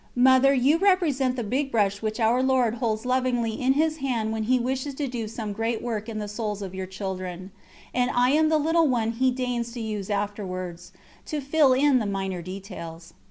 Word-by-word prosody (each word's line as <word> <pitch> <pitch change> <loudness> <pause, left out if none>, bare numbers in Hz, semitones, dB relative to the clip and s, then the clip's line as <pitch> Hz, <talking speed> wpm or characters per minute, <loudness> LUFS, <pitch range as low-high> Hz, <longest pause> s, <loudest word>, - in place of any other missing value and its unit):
Mother, 260 +2 +6
you 280 +4 +3
represent 310 -10 +2
the 240 - -3
big 270 +6 -1
brush 205 -3 +1
which 215 +1 -3
our 235 +3 +3
Lord 260 -4 +2
holds 220 -1 -1
lovingly 250 -2 +1
in 260 +1 +3
His 310 +2 +1
Hand 240 -6 -1
when 220 -1 -2
He 255 +3 +3
wishes 265 +3 -2
to 290 - -2
do 240 -3 -4
some 215 -1 -5
great 225 +2 -1
work 225 -2 -3
in 220 - -5
the 210 -1 -3
souls 210 -1 -4
of 190 -1 -7
your 190 0 -5
children; 185 -1 -6 0.4
and 245 0 +1
I 245 +1 +3
am 310 +2 +3
the 315 - +3
little 325 +2 +3
one 230 -4 +1
He 255 +3 +2
deigns 245 -2 -2
to 245 - -6
use 215 -3 -4
afterwards, 185 -4 -4 0.4
to 305 - -2
fill 280 -1 +3
in 270 0 +4
the 215 - -2
minor 195 -2 -3
details. 170 -3 -8
235 Hz, 205 wpm, -25 LUFS, 205-260 Hz, 0.4 s, Mother